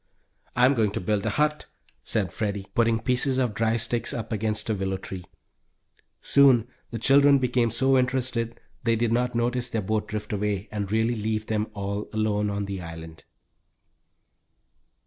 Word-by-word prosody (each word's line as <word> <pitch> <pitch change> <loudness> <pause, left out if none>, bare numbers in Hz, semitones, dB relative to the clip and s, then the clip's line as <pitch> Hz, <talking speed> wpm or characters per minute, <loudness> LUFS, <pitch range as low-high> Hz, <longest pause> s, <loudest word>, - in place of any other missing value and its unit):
"I'm 125 +3 +5
going 110 -5 +2
to - - -2
build 105 +3 -1
a - - +2
hut," 150 +6 0 0.4
said - - -1
Freddie, 100 -2 -2
putting 115 -1 +2
pieces 125 +3 +1
of 125 -4 +1
dry 115 +2 +1
sticks 115 +1 0
up 115 -1 -5
against 110 0 -1
a - - +2
willow 95 -1 -2
tree. 95 -1 -8 1.0
Soon 130 -5 +5 0.2
the 115 - -5
children 140 +4 +5
became 125 -2 +1
so 135 +4 +2
interested 125 -2 -1 0.2
they 115 -1 +2
did 115 0 0
not 125 0 0
notice 120 +1 0
their 110 -3 -2
boat 110 +2 -1
drift 105 0 -5
away, 105 0 -1
and 100 -2 -3
really 110 +2 +2
leave 110 -1 -2
them 110 0 -1
all 100 +1 -4
alone 105 -1 0
on 100 0 -2
the 100 -2 -5
island! 80 -1 -9
110 Hz, 165 wpm, -26 LUFS, 105-125 Hz, 1.0 s, I'm